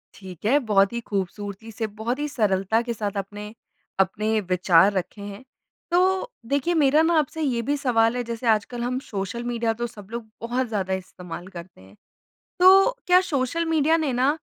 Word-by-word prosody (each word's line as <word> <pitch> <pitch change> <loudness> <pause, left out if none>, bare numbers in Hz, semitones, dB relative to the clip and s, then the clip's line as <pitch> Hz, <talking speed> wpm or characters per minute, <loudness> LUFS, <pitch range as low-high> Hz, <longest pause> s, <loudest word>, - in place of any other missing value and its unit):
ठीक 185 -2 -11
है। 255 +7 +4
बहुत 195 0 +4
ही 235 - -2
ख़ूबसूरती 200 +2 -4
से 220 0 -3
बहुत 240 +5 -2
ही 295 - -1
सरलता 210 -2 +1
के 235 0 -3
साथ 205 -2 -4
आपने 205 +2 -6 0.5
अपने 215 +3 +1
विचार 180 +1 +5
रखें 195 +2 -4
हैं। 205 +4 -9 0.5
तो 375 +6 +2 0.2
देखिए 285 +5 +1
मेरा 300 -1 +4
ना 330 +1 +2
आपसे 310 +2 -3
ये 255 -6 0
भी 285 +5 -1
सवाल 230 -4 +2
है। 245 - -1
जैसे 235 +1 -5
आजकल 225 +2 +1
हम 250 +1 -1
सोशल 210 -1 -5
मीडिया 235 -1 -1
तो 240 - 0
सब 205 -3 -13
लोग 230 -2 -6
बहुत 245 +2 -1
ज़्यादा 195 -4 -2
इस्तेमाल 180 -1 -7
करते 175 - -11
हैं। 95 +1 -17 0.6
तो 385 +5 +7 0.2
क्या 360 0 +6
सोशल 320 -1 -1
मीडिया 320 +1 +3
ने 270 - -1
ना 265 +5 +2
230 Hz, 180 wpm, -24 LUFS, 200-270 Hz, 0.6 s, तो